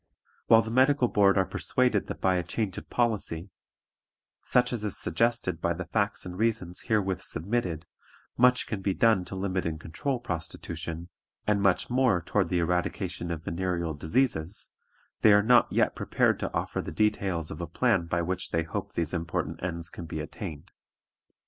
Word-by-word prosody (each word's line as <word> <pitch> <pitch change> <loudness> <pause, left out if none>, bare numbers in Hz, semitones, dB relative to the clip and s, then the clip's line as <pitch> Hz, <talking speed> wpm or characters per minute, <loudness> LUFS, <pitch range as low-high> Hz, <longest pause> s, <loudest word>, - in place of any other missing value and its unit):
"While 115 0 +7
the 110 - -5
Medical 130 +1 +4
Board 100 -1 +4
are 95 - +4
persuaded 110 +3 0
that - - -5
by 95 -1 +2
a - - +1
change 95 +2 -2
of - - -17
policy, 100 -7 -1 0.9
such 125 0 +2
as 115 -3 -2
is 105 - -2
suggested 90 -2 0
by 85 - +1
the 90 +2 -5
facts 100 +3 -1
and 90 0 -6
reasons 110 -6 0
herewith 100 -4 +1
submitted, 90 -3 -2 0.5
much 125 +1 +4
can 105 -3 -4
be 95 -1 0
done 110 -6 +3
to 95 - -7
limit 95 -1 -1
and 80 -1 -3
control 125 - -3
prostitution, 85 -3 -5 0.4
and 105 -1 +2
much 100 +3 +2
more 125 -7 +3
toward 85 - 0
the 90 - +1
eradication 90 +1 -1
of 80 -2 -4
venereal 85 -1 -2
diseases, 85 - 0 0.5
they 105 - +7
are 105 0 +5
not 120 +2 +5
yet - - +2
prepared - - +1
to - - -3
offer - - -2
the - - -6
details 95 -6 0
of - - -6
a - - -3
plan 85 - +1
by 85 0 0
which 90 +2 -3
they 80 0 0
hope 80 - -5
these 85 0 -1
important 85 -2 -3
ends 85 0 -3
can 85 - -8
be - - -4
attained. 75 -3 -7
95 Hz, 175 wpm, -28 LUFS, 85-110 Hz, 0.9 s, While